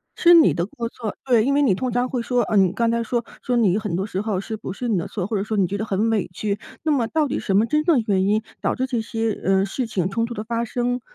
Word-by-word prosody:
是 345 0 +6
你 330 -2 +7
的 170 0 -1
过 230 +3 -5
错 225 -3 -6
对， 235 -4 +3
因 275 - +2
为 285 - +3
你 265 -9 +4
通 250 +7 -2
常 245 +2 0
会 250 -2 -2
说 245 +1 +1
呃， 215 - 0
你 190 -2 +4
刚 230 +1 +1
才 235 0 0
说 235 +1 -1 0.2
说 250 - -1
你 205 -5 +3
很 210 -5 -3
多 190 +2 -1
时 190 -3 -4
候 205 -3 -2
是 220 +2 -5
不 200 - -6
是 245 +5 -4
你 215 - +2
的 170 - -2
错， 190 -4 -4
或 215 -1 -1
者 195 - -1
说 215 +1 -3
你 195 - +3
觉 200 - -3
得 215 - -3
很 210 +2 0
委 220 -4 0
屈， 205 +1 -2 0.2
那 315 - +1
么 255 -6 +1
到 310 +3 +1
底 275 - -2
什 195 - -1
么 215 - +4
真 300 +5 +1
正 305 -8 +3
原 190 -2 +2
因 210 +2 +1 0.2
导 - - 0
致 260 - -1
这 245 -3 -1
些， 225 0 -2
呃， 195 0 +3
事 240 +5 -3
情、 185 -5 -1
冲 230 +3 0
突 235 - -6
的 215 - -5
发 230 +1 -2
生？ 245 +1 -1
225 Hz, 330 characters per minute, -22 LUFS, 200-245 Hz, 0.2 s, 你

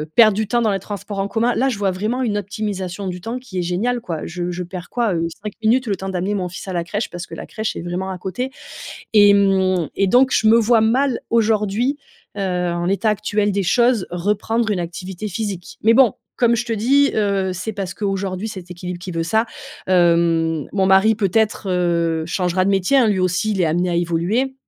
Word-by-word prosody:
perdre 215 -4 +6
du 215 -1 -1
temps 240 +2 +1
dans 215 - +2
les 195 - -1
transports 200 0 -6
en 195 - 0
commun, 235 +3 +1
là 265 +2 +2
je 235 - -3
vois 200 -1 +1
vraiment 215 +8 -2
une 210 -3 0
optimisation 200 -2 -4
du 180 -1 -5
temps 230 +5 -4
qui 210 -8 -6
est - - +1
géniale 210 +8 -1
quoi. 165 -7 -5
Je 175 0 -4
je 180 +1 -4
perds 180 0 -8
quoi, 235 -5 0
heu, 165 -1 0 0.2
5 210 - -5
minutes 245 +4 +3
le 200 - 0
temps 190 0 -5
d'amener 190 +2 -2
mon 180 -2 -2
fils 180 +2 -9
à 185 - -4
la 170 -1 -1
crèche 205 +6 -3
parce 175 0 -7
que 165 - -9
la - - -7
crèche 220 0 -4
est - - -5
vraiment 180 +2 -3
à 185 - -4
côté 190 +9 -4 0.7
et 205 -1 +7
hem 190 -4 +3
et 195 - +2
donc 250 +6 +4
je 220 - +2
me 225 +1 +7
vois 230 0 +4
mal 255 +3 +2
aujourd'hui, 225 +4 +1 0.4
heu, - - -4
en 180 -2 -1
l'état 200 +4 +1
actuel 205 0 0
des 200 0 0
choses, 235 +2 +2
reprendre 210 +5 -1
une 200 - 0
activité 180 +3 -6
physique. 200 -2 -5
Mais 225 +2 +5
bon, 250 -5 +5 0.2
comme 235 -1 +3
je 235 - -1
te 235 - -3
dis, 270 +6 +3
heu, 200 -3 +1
c'est 200 +5 -4
parce 195 -3 -5
qu'aujourd'hui 195 0 -2
cet 185 -4 -9
équilibre 180 0 -6
qui 180 +1 -6
veut 165 -1 -2
ça, 220 +7 +1 0.4
hem, 170 -3 +2
mon 190 -1 +2
mari 195 +3 +5
peut-être, 210 0 0
heu, 170 -3 0
changera 180 +1 0
de 200 - +2
métier, 195 +8 +2
hein, 240 -5 +5
lui 200 -2 +1
aussi 185 +3 0
il 195 - -2
est - - +4
amené 175 +3 +1
à 170 - -1
évoluer. 175 +11 0
195 Hz, 225 wpm, -20 LUFS, 180-220 Hz, 0.7 s, et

